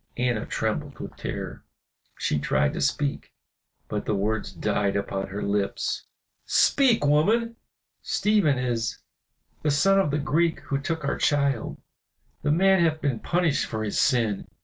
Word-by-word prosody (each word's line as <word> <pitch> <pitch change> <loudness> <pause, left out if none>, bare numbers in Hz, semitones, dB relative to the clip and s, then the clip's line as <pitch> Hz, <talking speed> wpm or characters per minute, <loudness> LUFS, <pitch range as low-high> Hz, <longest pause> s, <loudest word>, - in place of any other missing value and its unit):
Anna 120 -3 0
trembled - - -2
with - - -8
terror, - - -6 0.5
she 75 - 0
tried - - +1
to - - -3
speak, 140 - -1 0.6
but 105 -1 -4
the 105 - +1
words 105 +2 -1
died 100 -1 -1
upon 95 -1 -2
her 100 +1 -5
lips. 100 0 -1 0.4
"Speak, 250 - +3
woman!" 220 +11 +2 0.5
"Stephen 205 -10 +2
is 120 -3 -1 0.6
the 155 - 0
son 195 +7 +4
of 190 - +2
the 145 - 0
Greek 160 +3 +1
who 140 - -2
took 160 +1 -3
our - - -1
child. 140 -5 +1 0.6
The 150 - -1
man 190 +3 +4
hath 160 -1 +1
been 135 -7 -1
punished 170 -1 +1
for 110 -1 -3
his 105 - -1
sin. 115 -6 +1
140 Hz, 150 wpm, -25 LUFS, 110-165 Hz, 0.6 s, son